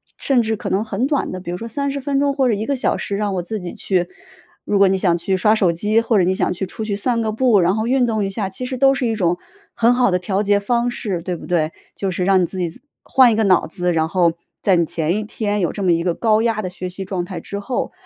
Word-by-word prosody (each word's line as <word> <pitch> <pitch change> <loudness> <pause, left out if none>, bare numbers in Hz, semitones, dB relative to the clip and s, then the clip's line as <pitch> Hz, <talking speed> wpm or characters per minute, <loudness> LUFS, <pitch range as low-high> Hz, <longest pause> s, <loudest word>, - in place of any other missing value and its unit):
甚 265 -3 +2
至 220 -1 -1
可 - - -5
能 200 +3 +1
很 220 +4 -1
短 290 -2 0
的， 185 - -6
比 175 - -6
如 180 - -3
说 230 - -6
30 280 +3 -2
分 280 0 0
钟 280 -1 +2
或 270 -2 +1
者 235 - +2
1 210 +1 -2
个 280 - 0
小 - - +1
时 200 - -3
让 205 -2 -1
我 180 - -1
自 215 +3 -4
己 180 -1 -6
去 180 -2 0 0.6
如 205 - +1
果 200 - +6
你 190 0 +2
想 180 -3 +2
去 190 +3 -1
刷 210 +3 +3
手 195 -6 +3
机， 210 +6 +1
或 230 -2 +1
者 185 - +4
你 185 +2 +2
想 - - 0
去 185 +2 -3
出 215 +4 -6
去 205 -2 -2
散 230 +2 0
个 220 -1 -1
步， 225 -4 +3
然 180 +3 +2
后 220 +1 -1
运 255 -1 +3
动 220 -3 0
一 - - -2
下， 195 -1 -2
其 250 +7 -6
实 255 0 -4
都 270 0 +5
是 250 - -1
一 225 - 0
种 175 -4 +1 0.4
很 235 +1 +4
好 245 -3 +3
的 180 - +2
调 190 +2 -1
节 205 -1 +2
方 235 +3 0
式， 195 -7 -3
对 180 0 -3
不 - - -10
对？ 165 -2 0 0.2
就 195 - -2
是 180 0 -2
让 190 -1 +4
你 175 - +2
自 190 - -7
己 175 +6 -3 0.2
换 255 -3 +5
一 - - +1
个 220 - +2
脑 185 -5 +3
子， 180 +1 -1
然 160 0 +1
后 170 -2 +2 0.3
在 195 - +4
你 170 - +3
前 160 +2 -1
一 215 - -1
天 210 -1 -2
有 175 - 0
这 200 - -5
么 180 - +3
一 165 0 +2
个 170 -1 0
高 220 -1 +2
压 225 -2 0
的 185 - -3
学 185 0 -6
习 190 +1 -6
状 185 -2 -3
态 175 -1 -6
之 200 +4 -6
后， 245 +5 -3
200 Hz, 310 characters per minute, -20 LUFS, 180-230 Hz, 0.6 s, 果